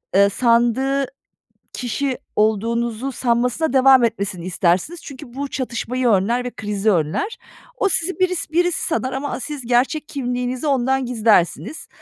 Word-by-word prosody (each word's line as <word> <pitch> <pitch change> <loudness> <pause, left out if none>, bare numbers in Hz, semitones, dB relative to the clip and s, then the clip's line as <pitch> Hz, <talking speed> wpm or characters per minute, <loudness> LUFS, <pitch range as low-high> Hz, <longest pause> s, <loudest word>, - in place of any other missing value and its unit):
ııı, 200 +1 +6
sandığı 240 +5 +2 0.7
kişi 255 +2 -2 0.2
olduğunuzu 230 +4 0
sanmasına 250 +5 0
devam 265 -2 +6
etmesini 200 -6 -2
istersiniz 185 - 0
çünkü 255 -3 -10
bu 280 +1 -3
çatışmayı 250 0 -2
önler 230 +5 +2
ve 250 - -3
krizi 210 0 0
önler. 185 - -1 0.4
O 405 - +2
sizi 370 0 -1
biris 365 -4 0
birisi 350 +1 +1
sanar 265 -6 -1
ama 275 +2 -3
a - - -4
siz 290 +1 -5
gerçek 255 +6 +1
kimliğinizi 250 0 -3
ondan 265 -1 +1
gizlersiniz 225 - +1
250 Hz, 135 wpm, -20 LUFS, 225-275 Hz, 0.7 s, ııı